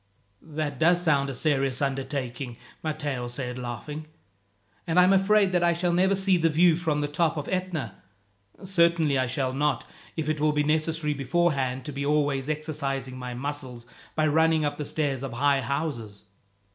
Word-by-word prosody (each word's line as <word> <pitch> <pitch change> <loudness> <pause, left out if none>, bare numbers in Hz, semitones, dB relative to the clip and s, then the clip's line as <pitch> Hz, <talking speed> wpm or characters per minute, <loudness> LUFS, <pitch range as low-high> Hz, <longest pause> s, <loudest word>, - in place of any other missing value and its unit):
"That 150 -3 -4
does 175 +2 +4
sound 145 -5 +2
a - - -3
serious 135 -2 +1
undertaking," 135 -3 -3 0.2
Matteo 150 -5 -3
said, 125 0 -5
laughing; 145 +6 -6 0.8
"and 165 +2 +3
I - - +8
am 185 +2 +5
afraid 195 0 +4
that 180 -1 +2
I 170 0 +4
shall 175 +1 0
never 190 +3 +3
see 190 -1 +3
the 165 -1 +2
view 165 +2 +5
from 160 -3 -1
the 145 - 0
top 160 +2 0
of 145 - -4
Etna. 180 - -3 0.6
Certainly 170 -6 +3
I 130 - +1
shall 130 +1 -1
not, 145 -2 0 0.3
if 160 -2 -2
it 155 -1 0
will 150 0 +2
be 150 0 +2
necessary 155 0 0
beforehand 135 -3 0
to - - -4
be 140 0 -4
always 145 -1 +1
exercising 140 -4 -3
my 125 -1 -5
muscles 130 -3 -6 0.3
by 155 - +2
running 160 0 +3
up 145 0 -2
the 150 - -4
stairs 140 -4 -1
of 135 -3 -5
high 140 +2 +2
houses." 120 -8 -4
150 Hz, 175 wpm, -26 LUFS, 135-160 Hz, 0.8 s, I